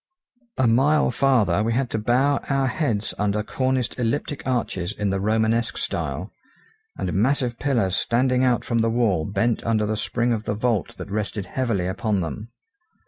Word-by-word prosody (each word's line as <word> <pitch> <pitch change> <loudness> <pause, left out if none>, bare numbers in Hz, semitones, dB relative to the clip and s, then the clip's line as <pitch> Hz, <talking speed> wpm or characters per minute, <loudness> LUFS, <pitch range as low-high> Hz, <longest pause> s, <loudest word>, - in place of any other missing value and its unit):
A 130 - +3
mile 135 +5 +3
farther 110 -8 +2
we 115 +2 0
had 125 +1 -1
to 110 - -1
bow 130 +6 +2
our 135 -1 +2
heads 120 -6 -1
under 105 +1 0
corniced 130 +1 -1
elliptic 140 +4 -1
arches 105 -8 -1
in 105 -2 -1
the 95 - 0
romanesque 110 +3 +1
style; - - -3 0.7
and - - -2
massive 120 +2 +1
pillars 115 -10 +1
standing 125 +2 +2
out 125 -2 +2
from 120 -1 0
the 115 0 +2
wall 110 -9 +1
bent 110 +4 0
under 110 -2 +1
the 110 +1 -1
spring 120 +3 0
of 110 -1 -3
the 105 - -1
vault 110 -3 -1
that 100 - -8
rested 105 -1 -2
heavily 115 -9 -1
upon 100 +2 -1
them. 105 +7 -5
115 Hz, 170 wpm, -23 LUFS, 105-125 Hz, 0.7 s, A